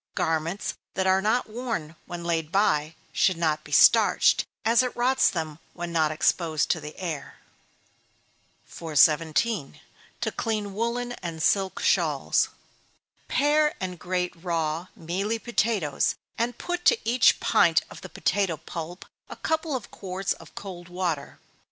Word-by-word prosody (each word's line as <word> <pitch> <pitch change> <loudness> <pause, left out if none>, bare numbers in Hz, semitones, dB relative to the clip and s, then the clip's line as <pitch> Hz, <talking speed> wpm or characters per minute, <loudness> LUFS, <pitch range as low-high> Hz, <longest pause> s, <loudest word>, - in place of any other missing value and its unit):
Garments 165 +4 -1 0.2
that 190 - 0
are 190 0 +4
not 220 +5 +1
worn, 215 -9 -4
when 175 -1 -6
laid 165 -2 -1
by, 160 -6 +2 0.2
should 185 -3 +2
not 160 -2 0
be - - -13
starched, - - +5 0.2
as 230 +2 +5
it 250 -1 -2
rots 260 +2 +3
them 160 -3 -4 0.2
when 175 0 -5
not 160 -2 +2
exposed 155 0 +1
to 160 - -1
the 150 +1 -9
air. 165 -6 -5 1.3
417. 160 - +1 0.4
To - - 0
clean 215 -3 -2
Woollen 235 +3 -2
and 165 -3 -4
Silk 195 -2 +2
Shawls. - - +2 0.8
Pare 300 +1 +2
and 180 -2 -4
grate 180 +1 -2
raw, 165 -1 -2
mealy 195 +7 -2
potatoes, 220 - 0 0.2
and 240 +1 -1
put 355 0 -3
to 470 - +6
each 245 +2 +4
pint - - +4
of - - -12
the - - -9
potato 195 -6 0
pulp 165 +3 -7 0.2
a - - -7
couple 320 -2 -1
of 245 - -6
quarts 190 0 -3
of 165 - -16
cold 175 -3 -8
water. 175 -5 -3
180 Hz, 140 wpm, -26 LUFS, 160-225 Hz, 1.3 s, to